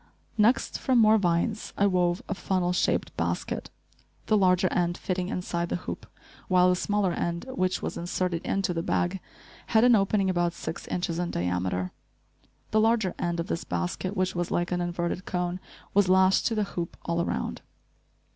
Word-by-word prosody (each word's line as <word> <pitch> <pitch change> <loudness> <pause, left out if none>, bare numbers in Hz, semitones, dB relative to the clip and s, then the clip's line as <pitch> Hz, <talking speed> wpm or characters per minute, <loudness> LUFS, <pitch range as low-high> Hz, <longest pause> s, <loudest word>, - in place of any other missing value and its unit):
Next, 225 +3 +2
from 260 -2 +2
more 220 -1 +6
vines, 185 +4 0
I 200 - +3
wove 180 -2 +1
a - - -1
funnel 185 -2 0
shaped - - 0
basket, - - -2 0.6
the 215 - +3
larger 185 -2 +4
end 175 0 +1
fitting 185 0 -2
inside 175 -1 -2
the - - -1
hoop, - - -6 0.4
while 180 -1 +5
the 180 - +3
smaller 205 0 0
end, 170 +3 -2
which 185 -7 -1
was - - -3
inserted 175 0 -2
into 195 -2 0
the 165 - -1
bag, 180 +2 0 0.5
had 220 0 +4
an 245 0 +6
opening 195 -1 +2
about 175 -2 +1
six 160 -1 -6
inches 175 -1 -2
in 175 -1 -1
diameter. 90 +1 -1 0.8
The 215 - +4
larger 220 -4 +2
end 170 0 -1
of 165 - -1
this 165 - -3
basket, 90 - -3
which 185 0 +1
was 175 -1 -2
like 175 +1 -1
an 175 0 0
inverted 175 +1 -2
cone, 180 0 -2 0.3
was 200 -2 +4
lashed 190 +1 +4
to 230 - -1
the 215 - +1
hoop, 170 -1 -4
all 170 0 0
around. - - -3
180 Hz, 175 wpm, -27 LUFS, 175-195 Hz, 0.8 s, more